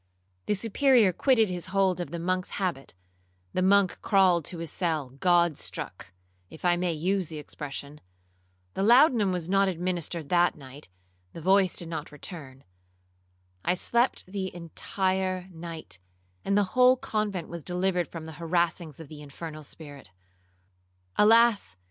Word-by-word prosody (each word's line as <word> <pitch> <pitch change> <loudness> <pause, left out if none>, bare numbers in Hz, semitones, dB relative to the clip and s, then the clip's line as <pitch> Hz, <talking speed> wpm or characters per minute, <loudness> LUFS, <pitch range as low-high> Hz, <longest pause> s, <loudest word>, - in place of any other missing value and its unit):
The 210 - +2
Superior 230 0 +3
quitted 225 -1 +3
his 180 -1 -4
hold 190 -2 +1
of 175 - -5
the 170 - -5
monk's 185 +2 -1
habit,—the 90 - -6
monk 195 0 +3
crawled 185 -6 +3
to 175 - -6
his 165 -2 -5
cell 155 -7 -2
God 175 -2 +3
struck, 90 - -5 0.4
if 160 - -10
I 175 0 +4
may 175 0 0
use 180 +3 -1
the 155 - -8
expression,—the 90 - -10
laudanum 235 -2 +5
was 175 -3 -2
not 195 +1 +3
administered 175 -3 -3
that 175 0 +3
night,—the 90 - -14
voice 190 +2 +3
did 170 - -3
not 155 -3 -5
return,—I 90 - -9
slept 235 +7 +1
the 190 0 -4
entire 185 +2 -2
night, 160 - -8 0.4
and 200 - +1
the 200 -2 0
whole 255 0 +6
convent 210 -7 -2
was 170 0 -7
delivered 180 +1 -1
from 165 -2 -8
the 160 0 -10
harassings 170 -2 -1
of 160 - -9
the 150 0 -11
infernal 155 +2 -8
spirit. 145 - -11 1.1
Alas! 225 - +4
170 Hz, 135 wpm, -27 LUFS, 140-190 Hz, 1.1 s, whole